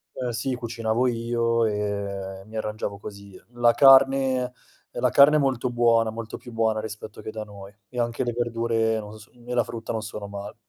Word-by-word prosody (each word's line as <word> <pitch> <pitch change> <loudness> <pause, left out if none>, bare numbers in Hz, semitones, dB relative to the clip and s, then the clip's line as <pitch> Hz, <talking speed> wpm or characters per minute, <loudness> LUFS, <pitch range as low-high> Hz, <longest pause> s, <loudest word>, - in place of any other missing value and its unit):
Eh, 125 -2 -3
sì 130 +3 -2
cucinavo 115 0 -1
io 115 -1 +1
e 100 -2 -3
e - - -16
mi 110 +1 -13
arrangiavo 105 -2 -4
così. 100 -2 -10 0.2
La 120 -1 +4
carne 135 -1 +6 0.5
uhm, - - -5
la - - +3
carne 145 +2 +6
è - - +2
molto 130 -3 0
buona, 115 -2 +3
molto 115 0 -6
più 120 - -12
buona 110 -1 +1
rispetto 110 0 -8
che 110 - -6
da 110 -1 -5
noi, 100 -1 -12 0.2
e 125 - -11
anche 120 +1 -1
le 120 - -1
verdure 115 -1 0
non 105 0 -9
s 110 +2 -15
e 120 0 -8
la 120 - +3
frutta 115 0 -6
non 110 - -2
sono 105 -2 -6
male. 100 0 -7
115 Hz, 200 wpm, -25 LUFS, 105-120 Hz, 0.5 s, carne